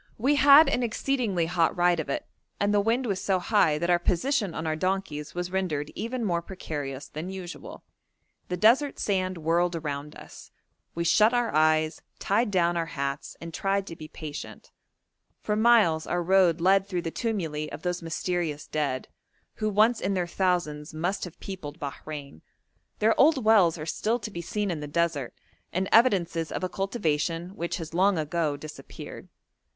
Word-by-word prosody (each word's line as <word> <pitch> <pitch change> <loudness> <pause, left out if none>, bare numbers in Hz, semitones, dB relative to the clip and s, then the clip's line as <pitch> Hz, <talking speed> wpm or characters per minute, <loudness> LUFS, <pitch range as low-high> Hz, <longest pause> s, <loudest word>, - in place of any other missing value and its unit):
We 265 +6 +2
had 290 +2 +8
an 250 - +1
exceedingly 230 -6 0
hot 170 0 +1
ride 175 -1 +3
of 150 - -4
it, - - -2 0.3
and 205 0 +1
the 205 - +4
wind 230 +5 +1
was 200 -5 -2
so 190 -2 +2
high 180 -5 +2
that 170 +3 0
our 175 - +4
position 200 - 0
on 160 - -4
our 155 -1 0
donkeys 180 -4 -2
was 175 0 -3
rendered 165 -6 -2
even 235 +1 -3
more 170 -3 0
precarious 145 -7 -6
than 160 +4 -6
usual. 185 -2 -8 0.6
The 180 - -3
desert 240 +9 +4
sand 185 -2 -1
whirled 170 +2 +1
around 150 -2 -5
us: - - -12 0.5
we 170 - -1
shut 215 +7 +4
our 240 -1 0
eyes, 155 0 +2 0.2
tied 210 +4 +1
down 175 -3 +2
our 165 -1 -1
hats, 140 -2 -4
and 165 0 -8
tried 195 +2 0
to 165 - -8
be 155 -1 -9
patient; 155 -1 -8 0.7
for 210 - -1
miles 215 -8 +4
our 175 0 -1
road 180 -2 +3
led 195 +2 +4
through 180 -3 -2
the 165 - -3
tumuli 160 -10 -2
of 145 +2 -8
those 180 0 -2
mysterious 165 -2 -2
dead, 140 -4 -2 0.5
who 215 0 0
once 215 +3 +3
in 195 +1 0
their 180 -1 0
thousands 170 -4 -1
must 175 +6 -1
have 175 - -11
peopled 175 -5 -7
Bahrein; 140 - -7 0.6
their 220 +2 +3
old 275 -4 +4
wells 200 -7 +5
are 155 - -6
still 220 +8 0
to 215 - -6
be 170 - -5
seen 205 +3 -2
in 165 - -3
the 150 - -6
desert, 155 -4 -1 0.4
and 185 +2 -1
evidences 180 -8 +3
of - - -4
a 185 - -1
cultivation 170 -4 -1
which 185 -2 -4
has 165 -2 -7
long 190 +2 +3
ago 155 -1 -1
disappeared. 150 +1 -10
175 Hz, 175 wpm, -27 LUFS, 155-200 Hz, 0.7 s, had